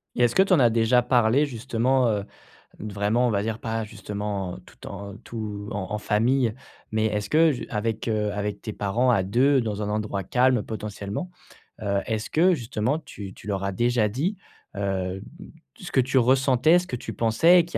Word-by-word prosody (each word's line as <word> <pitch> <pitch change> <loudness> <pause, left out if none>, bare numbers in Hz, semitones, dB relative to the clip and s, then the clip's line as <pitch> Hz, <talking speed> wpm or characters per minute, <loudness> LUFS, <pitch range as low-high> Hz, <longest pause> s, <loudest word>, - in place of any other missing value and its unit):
Et 120 - +2
est-ce 120 - +2
que 190 - +6
tu 195 - +1
en 175 - +5
as 120 -3 +6
déjà 115 +2 +3
parlé, 125 +3 +3
justement, 125 0 +1
heu, 105 -2 0 0.6
d 105 -1 -6
vraiment 105 +5 +1
on - - +1
va 100 -2 0
dire 110 +1 -3
pas, 115 -1 -2
justement, 105 -3 -5
tout - - -14
en 100 0 -7
tout 105 -2 -6
en 95 -2 -3
en 105 - -1
famille? 115 +3 +1 0.4
Mais 110 0 +1
est-ce 105 -1 -2
que 160 0 +5
ju 130 - -5
avec, 110 +2 -2
heu, 105 -2 0
avec 105 0 -3
tes 110 - -5
parents 110 +6 +1
à 100 -6 +3
2 130 +8 +3
dans 105 -3 -3
un 105 - -2
endroit 105 -2 -2
calme 125 -1 +3
potentiellement, 105 - -5 0.5
heu, 100 -2 0
est-ce 110 -1 -3
que 180 +4 +4
justement 120 +1 -1
tu 105 -10 -9
tu - - -14
leur 100 -2 -2
as 100 - -1
déjà 120 +1 +1
dit, 160 - -2 0.4
hem, 95 -1 -2 0.5
ce 185 - -9
que 130 - +4
tu 130 +1 +2
ressentais? 130 +5 +4
Ce 180 - -1
que - - -3
tu 120 - -6
pensais? 165 +11 +5
Qu'il 170 - -11
110 Hz, 200 wpm, -25 LUFS, 105-130 Hz, 0.6 s, que